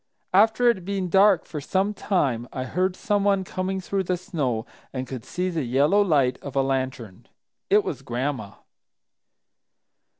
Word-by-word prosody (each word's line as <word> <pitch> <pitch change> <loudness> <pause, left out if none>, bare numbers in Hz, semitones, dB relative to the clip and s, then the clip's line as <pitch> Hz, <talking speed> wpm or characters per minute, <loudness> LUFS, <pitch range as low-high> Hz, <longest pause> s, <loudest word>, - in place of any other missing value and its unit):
After 220 +5 +4
it 235 - +4
had 180 - -12
been 195 -2 -2
dark 195 -1 +5
for 150 - -6
some 195 +7 0
time, 135 - 0
I 130 - -4
heard 180 +7 -1
someone 205 -4 +1
coming 185 +1 -3
through 190 +1 -2
the 180 0 0
snow 145 - -2 0.3
and 130 -1 -4
could 130 -2 -7
see 180 +1 -2
the 165 -2 -1
yellow 140 +10 +3
light 140 -10 +2
of 140 -1 -8
a 135 - +3
lantern. 130 -7 -3 0.4
It 205 +1 +5
was 135 -4 -4
Gran'ma. 125 -4 -3
170 Hz, 160 wpm, -24 LUFS, 130-195 Hz, 0.4 s, dark